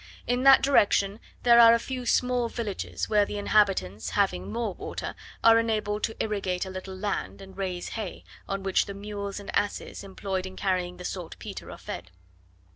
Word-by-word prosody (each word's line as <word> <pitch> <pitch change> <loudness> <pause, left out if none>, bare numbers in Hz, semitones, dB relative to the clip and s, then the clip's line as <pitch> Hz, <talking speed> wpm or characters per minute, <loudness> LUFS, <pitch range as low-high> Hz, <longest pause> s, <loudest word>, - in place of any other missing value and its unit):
In 245 +1 0
that 270 0 +7
direction 205 -6 +3 0.2
there 235 -1 +7
are 230 0 +9
a - - +3
few 250 0 -5
small 250 -1 +2
villages, 220 -5 -4
where 210 -1 +4
the 205 - -4
inhabitants, 195 - +2
having 190 - +1
more 230 -4 -2
water, - - -5 0.3
are 230 0 +7
enabled 215 -2 -1
to 225 - -6
irrigate 195 -4 -1
a 190 - -7
little 190 0 -7
land, 200 +1 -3
and 190 -1 -12
raise 185 -2 -3
hay, 215 -5 -5 0.3
on 195 0 -2
which 195 -1 +2
the 200 - -6
mules 200 0 -5
and 200 - -7
asses, 205 - -2
employed 190 -1 -4
in 185 - -10
carrying 180 -2 -1
the 180 - -8
saltpetre, 175 -3 -6
are - - -8
fed. 90 0 -7
200 Hz, 180 wpm, -27 LUFS, 190-225 Hz, 0.3 s, are